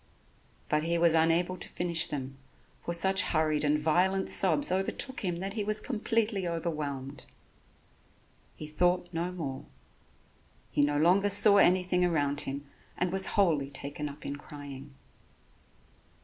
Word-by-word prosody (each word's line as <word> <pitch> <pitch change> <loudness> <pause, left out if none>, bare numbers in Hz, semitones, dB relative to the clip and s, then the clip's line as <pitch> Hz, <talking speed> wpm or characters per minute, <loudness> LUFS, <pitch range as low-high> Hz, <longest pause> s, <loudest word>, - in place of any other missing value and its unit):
But 150 - 0
he 170 +2 -1
was 170 -1 +3
unable 165 +3 +1
to - - -6
finish 170 -1 +2
them, 135 -2 -6 0.5
for - - -4
such 190 +3 +3
hurried 155 -2 0
and 150 0 +2
violent 180 +5 +1
sobs 160 -4 +4
overtook 195 +8 -1
him 180 -4 -2
that 195 +3 -5
he 215 -1 -3
was 215 +1 +1
completely 215 -4 -1
overwhelmed. 145 -5 -5 1.3
He 155 - -8
thought 175 +4 0
no 170 +2 -3
more, 145 -7 -6 1.1
he - - +1
no 145 0 +1
longer 185 +6 +3
saw 205 +1 +6
anything 180 -1 +3
around 145 -4 0
him 140 0 -6 0.3
and 180 0 -1
was 190 0 0
wholly 155 -9 +2
taken 145 +2 -6
up 145 +1 -12
in 140 - -5
crying. 145 -1 -11
170 Hz, 140 wpm, -29 LUFS, 145-185 Hz, 1.3 s, saw